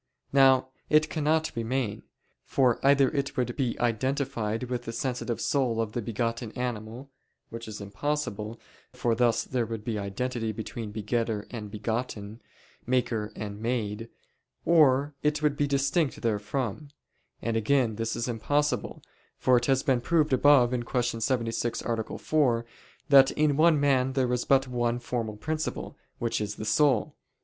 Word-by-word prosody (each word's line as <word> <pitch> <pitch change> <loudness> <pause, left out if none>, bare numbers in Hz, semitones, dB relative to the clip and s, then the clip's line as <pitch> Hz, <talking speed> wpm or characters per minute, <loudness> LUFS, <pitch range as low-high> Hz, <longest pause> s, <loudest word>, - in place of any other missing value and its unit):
Now 135 -1 +5 0.2
it 155 0 +4
cannot 155 0 0
remain. 115 -1 -2 0.4
For 125 -4 +1
either 135 -1 +5
it 140 -2 -2
would 125 -1 -1
be 130 -5 -1
identified 120 -2 -1
with 125 -1 -4
the 115 - -4
sensitive 125 -1 -3
soul 125 -5 0
of 110 -2 -1
the 120 - -3
begotten 115 +1 -2
animal; 125 +1 -5 0.4
which 115 0 -7
is 105 -1 -7
impossible, 110 0 -3 0.3
for 120 - 0
thus 115 0 +2
there 120 -3 -2
would 115 -1 -5
be 110 -3 -2
identity 115 +3 -3
between 110 0 -6
begetter 110 0 -2
and 110 -4 -6
begotten, 110 0 -4 0.5
maker 120 -4 0
and 105 -1 -6
made: 115 -1 -2 0.6
or 145 -3 +4
it 150 0 0
would 150 -1 +2
be 145 0 +1
distinct 140 +2 +1
therefrom; 115 +4 -2 0.5
and 115 -1 -2
again 115 0 +2
this 115 0 -2
is 120 +1 -2
impossible, 145 +6 -1 0.3
for 130 - +3
it 120 0 +2
has 135 -1 +2
been 130 -4 +2
proved 155 0 +2
above 130 -2 +5
(Q. 120 -1 -1
76, 115 -1 -1
A. 115 -2 -3
4) 125 -7 +1 0.4
that 135 -1 +8
in 150 -2 +1
one 155 -1 +4
animal 130 -2 +2
there 130 -2 +1
is 125 - -1
but 135 -1 +3
one 120 -1 0
formal 115 -3 -4
principle, 155 +6 -3 0.2
which 115 -1 -1
is 105 -1 -3
the 110 - -6
soul. 125 +2 +2
120 Hz, 150 wpm, -28 LUFS, 115-135 Hz, 0.6 s, that